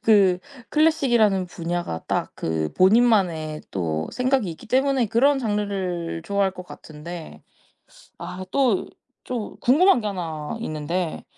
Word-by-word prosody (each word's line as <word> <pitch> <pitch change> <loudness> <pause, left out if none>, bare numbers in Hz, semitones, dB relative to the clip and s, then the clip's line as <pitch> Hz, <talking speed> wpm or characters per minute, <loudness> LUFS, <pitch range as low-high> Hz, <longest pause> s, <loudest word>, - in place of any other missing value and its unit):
그 195 -5 +5 0.3
클래식이라는 240 - +3
분야가 170 - -4
딱 - - -1
그 80 -1 -2
본인만의 185 -7 +3
또 80 -4 -2
생각이 255 -5 +1
있기 160 - -11
때문에 265 0 +2
그런 270 +6 +3
장르를 195 -7 -2
좋아할 200 0 +1
것 180 - -9
같은데 165 +2 -10 0.8
아 180 +2 -6
또 250 -5 +2 0.4
좀 240 -4 -5
궁금한 305 +4 +5
게 215 - -2
하나 165 -3 -4
있는데 165 -1 -3
190 Hz, 260 characters per minute, -23 LUFS, 165-235 Hz, 0.8 s, 그